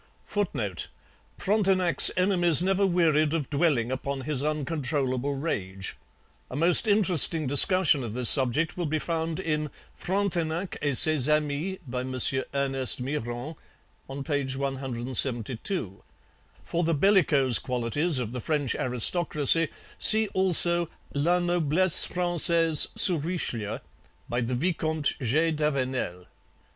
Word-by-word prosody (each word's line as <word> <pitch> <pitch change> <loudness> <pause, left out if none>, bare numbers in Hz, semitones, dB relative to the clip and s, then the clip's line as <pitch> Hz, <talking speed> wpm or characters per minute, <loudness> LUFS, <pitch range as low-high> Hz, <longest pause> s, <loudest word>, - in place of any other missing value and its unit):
[Footnote: 120 - -4 0.5
Frontenac's 190 -4 +2
enemies 175 -3 +2
never 195 +1 +1
wearied 160 -3 +1
of 150 -4 -5
dwelling 140 -6 0
upon 135 +1 -5
his 140 -1 -3
uncontrollable 140 -3 -3
rage. 100 - -6 0.5
A - - -8
most 170 - +2
interesting 180 -6 +2
discussion 145 +1 +3
of 115 -2 -7
this 125 -1 +1
subject 135 +5 +3
will 175 -3 -4
be 155 +1 -2
found 165 +1 -4
in 155 -4 -3 0.2
Frontenac 180 -2 -3
et 145 -4 +1
Ses 155 -3 +5
Amis 150 +5 -2
by 125 +1 -5
M. 130 0 -6 0.4
Ernest 135 -2 +1
Myrand 125 +2 -6 0.7
(p. 140 -4 -3
172). 130 - -3 0.6
For 170 +1 -3
the 165 0 -1
bellicose 150 - +2
qualities 125 +6 -2
of 120 -3 -4
the 125 0 -7
French 145 -2 -2
aristocracy 150 +5 +1 0.3
see 220 0 +5
also 175 -2 +5 0.2
La 165 +5 0
Noblesse 175 0 +4
Francaise 170 -3 +3
sous 170 -7 +2
Richelieu 120 - -4 0.5
by 120 +1 -3
the 120 +1 -3
Vicomte 155 0 -2
G. 155 +7 0
d'Avenel. 130 - -3
150 Hz, 115 wpm, -25 LUFS, 130-175 Hz, 0.7 s, Ses